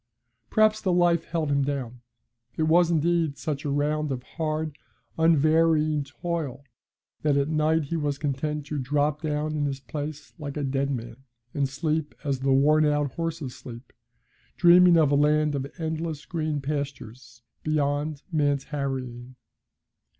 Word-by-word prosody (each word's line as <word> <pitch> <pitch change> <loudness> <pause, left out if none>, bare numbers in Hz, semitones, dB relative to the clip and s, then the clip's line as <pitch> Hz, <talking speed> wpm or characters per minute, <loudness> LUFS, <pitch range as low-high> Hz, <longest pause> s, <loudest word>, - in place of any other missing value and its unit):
Perhaps 215 0 +3
the 190 - +1
life 175 -2 +3
held 160 -3 -2
him 140 0 +2
down. 130 -4 -4 0.6
It 160 - +1
was, 165 +2 +4
indeed, 165 -2 +1
such 150 -1 -4
a - - -1
round 150 +1 0
of 125 -2 -3
hard, 155 +1 -3 0.4
unvarying 155 -1 +3
toil 145 -2 -4 0.6
that 145 -2 +2
at 140 +1 +1
night 155 +1 +2
he 145 +4 -4
was 145 -2 -1
content 150 +1 -2
to 145 0 -3
drop 145 +3 0
down 155 0 -2
in 145 -1 0
his 135 -1 -3
place 145 +3 -6
like 145 -1 -5
a 145 - -2
dead 135 0 0
man, 115 -3 -5 0.4
and 140 -2 0
sleep 155 +2 -2
as 140 -3 -1
the 135 +1 +1
worn 150 +3 +4
out 145 -2 +1
horses 165 -6 -4
sleep, 120 0 -11 0.6
dreaming 175 0 +7
of 155 -3 +4
a - - +4
land 150 +1 +3
of 140 0 -3
endless 160 -2 -3
green 155 -3 -2
pastures, 130 -4 -6 0.2
beyond 145 -1 -1
man's 145 -3 +1
harrying. 130 -4 -5
150 Hz, 150 wpm, -26 LUFS, 140-155 Hz, 0.6 s, dreaming